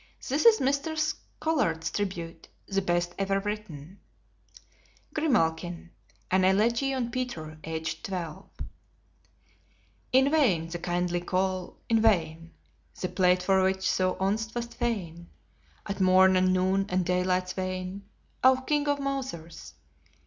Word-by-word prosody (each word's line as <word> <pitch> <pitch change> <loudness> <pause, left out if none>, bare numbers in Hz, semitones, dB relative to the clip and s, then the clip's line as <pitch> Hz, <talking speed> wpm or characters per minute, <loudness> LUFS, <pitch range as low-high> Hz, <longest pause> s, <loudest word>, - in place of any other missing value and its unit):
This 290 - +3
is 450 -1 +7
Mr. 280 +4 0
Scollard's 310 - -1
tribute, 175 -5 -4 0.2
the 195 -1 0
best 175 -1 0
ever 195 0 +1
written: 195 -5 -6 1.1
GRIMALKIN 175 - 0 0.4
AN 185 0 +3
ELEGY 230 +8 +2
ON 250 -3 -2
PETER, 160 -12 -5
AGED 160 +1 -4
TWELVE 175 -5 -5 1.6
In 265 +2 +4
vain 195 - +2
the 175 +1 -5
kindly 175 0 -1
call: 185 0 -2
in 225 -1 +3
vain 165 -6 +1 0.5
The 185 - -2
plate 180 -1 +2
for 190 0 +3
which 190 0 +1
thou 185 0 +1
once 215 +4 -2
wast 235 0 -4
fain 175 -8 -3 0.6
At 200 -1 -4
morn 185 0 +6
and 185 0 +3
noon 190 +2 +1
and 185 0 0
daylight's 180 0 0
wane, 185 +1 -4 0.3
O 260 0 +6
King 290 +2 0
of 285 0 +1
mousers. 255 - -5
190 Hz, 125 wpm, -28 LUFS, 175-235 Hz, 1.6 s, is